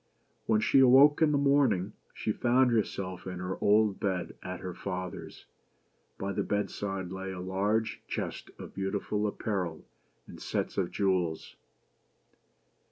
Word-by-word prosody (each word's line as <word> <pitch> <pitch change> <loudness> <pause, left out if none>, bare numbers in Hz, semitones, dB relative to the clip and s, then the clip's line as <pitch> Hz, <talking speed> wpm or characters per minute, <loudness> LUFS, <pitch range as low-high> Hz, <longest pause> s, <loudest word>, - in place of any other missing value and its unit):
When 110 -1 +3
she 135 - +4
awoke 135 +4 +7
in 155 -2 +5
the 145 - +2
morning, 140 -9 +2 0.2
she 110 - -2
found 125 +3 +3
herself 95 -5 -2
in 90 -1 -5
her 90 +1 -4
old 105 -1 +3
bed 95 -3 -2
at 90 0 -6
her 90 -1 -5
father's. 90 -2 -6 0.7
By 100 +1 -3
the - - -1
bedside 95 -2 -3
lay 95 0 -5
a 95 - -6
large 100 +4 -1
chest - - -4
of - - -10
beautiful 100 +2 -2
apparel 95 -6 -3 0.4
and - - -12
sets - - -2
of 90 -3 0
jewels. 90 -5 -1
100 Hz, 140 wpm, -30 LUFS, 95-110 Hz, 0.7 s, awoke